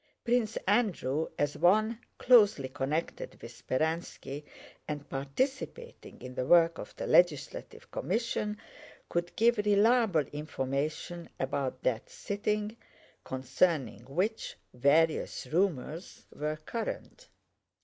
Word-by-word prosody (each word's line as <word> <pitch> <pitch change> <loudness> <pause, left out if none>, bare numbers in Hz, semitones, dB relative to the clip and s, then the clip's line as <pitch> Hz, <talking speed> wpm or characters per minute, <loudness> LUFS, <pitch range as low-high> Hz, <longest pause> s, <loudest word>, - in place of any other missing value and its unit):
Prince 235 -3 +1
Andrew, 185 - +1
as 145 0 0
one 215 +6 +3 0.2
closely 210 - +5
connected 145 +5 -3
with - - -9
Speránski 155 -1 -3 0.4
and 145 -1 -5
participating 265 - -4
in 125 0 -7
the 125 0 -2
work 170 0 +5
of - - -8
the - - -4
legislative 175 -6 +1
commission, 210 0 -1 0.5
could 175 0 -2
give 235 0 +4
reliable 210 -3 +4
information 150 +3 -3
about 135 -1 -2
that 115 -3 0
sitting, 210 +1 -2 0.5
concerning 130 - 0
which 185 - -2 0.2
various 145 +6 +2
rumors 170 -2 -1
were 150 +1 -2
current. 230 -1 -5
170 Hz, 100 wpm, -30 LUFS, 140-210 Hz, 0.5 s, closely